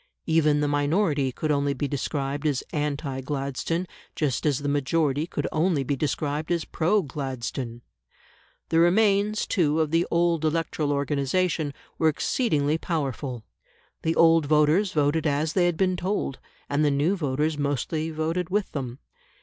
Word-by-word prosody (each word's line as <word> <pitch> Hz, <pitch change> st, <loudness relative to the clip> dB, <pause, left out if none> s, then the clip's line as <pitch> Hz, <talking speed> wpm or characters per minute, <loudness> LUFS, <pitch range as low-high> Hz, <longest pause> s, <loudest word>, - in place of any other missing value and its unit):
Even 155 Hz, -2 st, +3 dB
the 145 Hz, -, +1 dB
minority 145 Hz, -1 st, +1 dB
could 155 Hz, +4 st, -2 dB
only 140 Hz, -1 st, +1 dB
be 140 Hz, +2 st, -2 dB
described 140 Hz, +1 st, -2 dB
as 140 Hz, -4 st, 0 dB
anti 145 Hz, -2 st, -2 dB
Gladstone, 140 Hz, +5 st, -2 dB, 0.3 s
just 150 Hz, -1 st, 0 dB
as 145 Hz, -3 st, +2 dB
the 145 Hz, 0 st, -4 dB
majority 145 Hz, +1 st, +1 dB
could -, -, -3 dB
only 160 Hz, -2 st, +1 dB
be 140 Hz, +2 st, -1 dB
described 150 Hz, +2 st, -2 dB
as 170 Hz, -2 st, 0 dB
pro 185 Hz, +5 st, +1 dB
Gladstone. 130 Hz, -4 st, -5 dB, 0.9 s
The 165 Hz, -, +3 dB
remains, 205 Hz, +4 st, +3 dB
too, 155 Hz, -4 st, +1 dB
of 155 Hz, -2 st, +1 dB
the 165 Hz, +1 st, +2 dB
old 170 Hz, -1 st, +2 dB
electoral 155 Hz, -2 st, 0 dB
organisation 145 Hz, +3 st, 0 dB, 0.3 s
were 160 Hz, -, +4 dB
exceedingly 155 Hz, -, 0 dB
powerful; 135 Hz, -7 st, -3 dB, 0.6 s
the 160 Hz, 0 st, 0 dB
old 165 Hz, -2 st, +5 dB
voters 155 Hz, +6 st, +3 dB
voted 150 Hz, +2 st, +1 dB
as 150 Hz, +2 st, 0 dB
they 180 Hz, -2 st, +3 dB
had 175 Hz, -2 st, -1 dB
been 185 Hz, 0 st, +2 dB
told, 180 Hz, -6 st, -2 dB, 0.3 s
and 145 Hz, +2 st, +1 dB
the 150 Hz, -, +4 dB
new 145 Hz, +7 st, +2 dB
voters 150 Hz, -1 st, -1 dB
mostly 145 Hz, +3 st, -1 dB
voted 165 Hz, +3 st, -2 dB
with 205 Hz, +1 st, 0 dB
them. 130 Hz, -4 st, -4 dB
150 Hz, 150 wpm, -25 LUFS, 140-165 Hz, 0.9 s, old